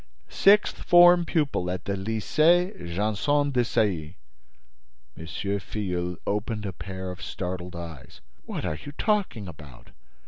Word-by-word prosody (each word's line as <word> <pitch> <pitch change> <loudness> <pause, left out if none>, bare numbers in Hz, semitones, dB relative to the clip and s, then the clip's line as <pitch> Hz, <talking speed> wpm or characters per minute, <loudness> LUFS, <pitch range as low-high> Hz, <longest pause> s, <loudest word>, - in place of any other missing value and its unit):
"Sixth 205 +2 +4
form 175 0 +7
pupil 145 - 0
at 90 -2 -4
the 100 - -1
Lycée 155 - +2 0.2
Janson 110 +10 +1
de 125 -2 +2
Sailly." 95 -8 -1 1.0
M. 80 - -9
Filleul 90 -1 -3
opened 105 +1 -2
a 95 - -4
pair 95 0 -6
of 90 - -10
startled 90 -1 -5
eyes. 85 -5 -9 0.3
"What - - -4
are 75 - -3
you 145 - -8
talking 195 - -1
about? 75 -7 -13
100 Hz, 130 wpm, -26 LUFS, 90-145 Hz, 1.0 s, form